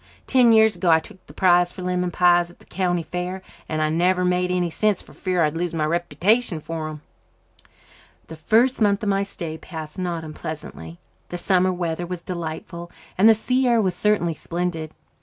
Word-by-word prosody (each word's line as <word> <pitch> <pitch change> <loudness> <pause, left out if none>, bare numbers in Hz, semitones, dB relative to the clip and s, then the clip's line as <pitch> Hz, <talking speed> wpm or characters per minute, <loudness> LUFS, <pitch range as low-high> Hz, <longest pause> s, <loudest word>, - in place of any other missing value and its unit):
Ten 250 -3 +4
years 220 -1 +5
ago 180 - 0
I 160 - +7
took 180 +3 -15
the - - -12
prize 175 -1 +3
for 185 - -9
lemon 180 0 -1
pies 175 0 +3
at 175 - -17
the - - -21
county 175 -2 -1
fair, 180 +2 -5 0.3
and 155 0 0
I've 155 0 0
never 180 +2 +2
made 180 0 +1
any 180 -2 0
since 210 +2 +1
for - - -17
fear 180 -2 0
I'd 150 0 0
lose 170 0 -2
my 155 -1 0
reputation 175 +4 +1
for 160 0 -5
them." 155 -1 -8 1.2
The 160 - -10
first 230 +11 +2
month 200 0 +2
of 210 - 0
my 195 0 +2
stay 170 -5 -6
passed 160 -1 -8
not 175 -3 -3
unpleasantly. 150 - -8 0.3
The 175 - -4
summer 185 +1 +2
weather 175 -1 -3
was 175 -1 -6
delightful, 170 0 -6 0.3
and 210 +4 +6
the 225 - +7
sea 255 +4 0
air 235 -1 +4
was 190 -4 +1
certainly 205 -6 +1
splendid. 165 0 -4
180 Hz, 195 wpm, -23 LUFS, 165-190 Hz, 1.2 s, I